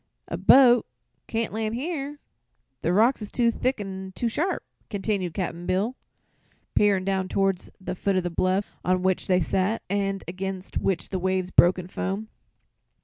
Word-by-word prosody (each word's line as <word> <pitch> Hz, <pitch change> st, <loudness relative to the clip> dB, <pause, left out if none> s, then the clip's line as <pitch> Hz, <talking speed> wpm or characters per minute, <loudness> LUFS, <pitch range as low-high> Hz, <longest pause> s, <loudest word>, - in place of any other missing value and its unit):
"A -, -, -3 dB
boat 250 Hz, -3 st, +6 dB, 0.4 s
can't 225 Hz, -2 st, -2 dB
land 220 Hz, 0 st, -1 dB
here; 290 Hz, +1 st, -3 dB, 0.6 s
the 170 Hz, -, +1 dB
rocks 225 Hz, +7 st, +4 dB
is 210 Hz, -, -5 dB
too 235 Hz, -2 st, +3 dB
thick 255 Hz, +2 st, -1 dB
an' 190 Hz, -1 st, -6 dB
too 240 Hz, -, -1 dB
sharp," 320 Hz, -, -1 dB, 0.3 s
continued 195 Hz, -4 st, -2 dB
Cap'n 175 Hz, -2 st, -3 dB
Bill, 205 Hz, +7 st, 0 dB, 0.8 s
peering 200 Hz, -3 st, +3 dB
down 190 Hz, -1 st, 0 dB
toward 195 Hz, -1 st, +1 dB, 0.2 s
the 185 Hz, -, -4 dB
foot 195 Hz, +1 st, 0 dB
of 185 Hz, -, +1 dB
the 175 Hz, -, -2 dB
bluff 185 Hz, +4 st, 0 dB
on 185 Hz, 0 st, +1 dB
which 185 Hz, -1 st, +1 dB
they 185 Hz, -1 st, +3 dB
sat 190 Hz, +6 st, 0 dB
and 195 Hz, -1 st, -1 dB
against 190 Hz, +1 st, -4 dB
which 190 Hz, -3 st, -1 dB
the 190 Hz, -, -2 dB
waves 185 Hz, 0 st, 0 dB
broke 175 Hz, +2 st, +6 dB
in 180 Hz, -1 st, -6 dB
foam. 195 Hz, +3 st, -3 dB
195 Hz, 165 wpm, -26 LUFS, 185-220 Hz, 0.8 s, boat